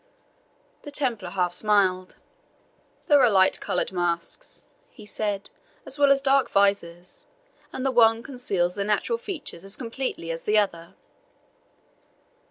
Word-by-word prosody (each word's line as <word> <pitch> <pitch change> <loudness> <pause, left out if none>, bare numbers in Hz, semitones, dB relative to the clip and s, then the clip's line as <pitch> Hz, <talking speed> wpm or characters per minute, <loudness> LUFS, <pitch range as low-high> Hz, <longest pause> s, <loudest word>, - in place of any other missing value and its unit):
The - - -9
Templar 245 -10 -2
half 180 -2 -1
smiled. 185 -2 +2 0.9
"There 290 -2 +5
are 245 - +6
light 190 -2 +4
coloured - - -2
masks," 175 - -3 0.2
he 215 - -14
said, 205 -1 -3 0.3
"as 280 - -2
well 285 -1 +5
as 275 0 +3
dark 275 -1 +3
visors, 180 -3 0 0.4
and 260 - -5
the 270 - +2
one 225 -2 +4
conceals 200 -10 -1
the 200 - -2
natural 210 - 0
features 370 - -6
as 195 +1 -4
completely 230 -8 -4
as 165 0 -5
the 210 +1 +2
other." 170 -5 -1
210 Hz, 135 wpm, -25 LUFS, 185-260 Hz, 0.9 s, are